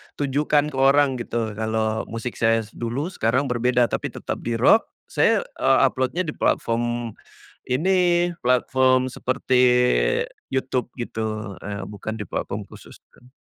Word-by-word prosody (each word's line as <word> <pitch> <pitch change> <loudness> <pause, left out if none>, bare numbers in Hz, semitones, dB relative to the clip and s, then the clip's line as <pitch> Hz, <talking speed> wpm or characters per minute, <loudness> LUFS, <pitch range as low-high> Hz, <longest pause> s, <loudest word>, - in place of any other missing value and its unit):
tunjukkan 145 +1 +1
ke 135 - -7
orang 135 -1 +4
gitu, 115 -2 -3
kalau 110 +1 -2
musik 115 +2 -6
saya 115 0 +3
dulu 125 +11 -4
sekarang 125 - +1
berbeda, 125 0 +2
tapi - - -2
tetap - - -5
di 120 - -3
rock. 135 - +4 0.2
Saya, - - +3 0.2
eee, - - +4
upload-nya 130 +7 -1
di 160 - -4
platform 120 0 0 0.6
ini, 175 +4 +2
platform 130 +1 +3
seperti 130 0 +1 0.9
YouTube 130 -2 -1
gitu, 110 -3 -4
eee, 100 -1 -5
bukan 105 +2 -6
di 105 - -4
platform - - -4
khusus - - -14 0.2
kan. 125 - -21
125 Hz, 135 wpm, -23 LUFS, 115-135 Hz, 0.9 s, orang